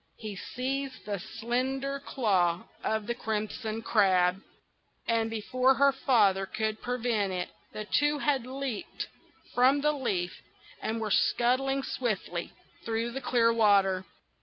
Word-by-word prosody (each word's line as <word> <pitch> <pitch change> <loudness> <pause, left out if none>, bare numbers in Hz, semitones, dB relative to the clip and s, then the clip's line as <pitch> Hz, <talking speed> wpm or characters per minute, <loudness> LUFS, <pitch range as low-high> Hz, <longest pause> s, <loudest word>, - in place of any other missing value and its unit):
He 215 -2 -6
seized 265 +6 -4
the 205 -2 -2
slender 265 +7 -2
claw 185 -11 +1 0.2
of 220 -1 0
the 235 - -1
Crimson 220 0 -3
Crab; 190 -4 +3 0.7
and 225 -1 +2
before 255 +4 +2
her 280 +1 +5
father 205 -8 +3
could 215 +1 -2
prevent 235 -5 0
it, 180 -1 -3 0.2
the 215 - -5
two 295 +6 +2
had 275 -4 0
leaped 265 -4 -4 0.4
from 260 +3 +4
the 300 +1 +3
leaf, 195 -11 -2 0.4
and 225 +1 -2
were 215 -2 -2
scuttling 265 +6 +2
swiftly 195 -10 -2 0.3
through 230 +1 -1
the 270 +3 -5
clear 235 -2 +3
water. 200 -4 +4
230 Hz, 130 wpm, -29 LUFS, 205-260 Hz, 0.7 s, her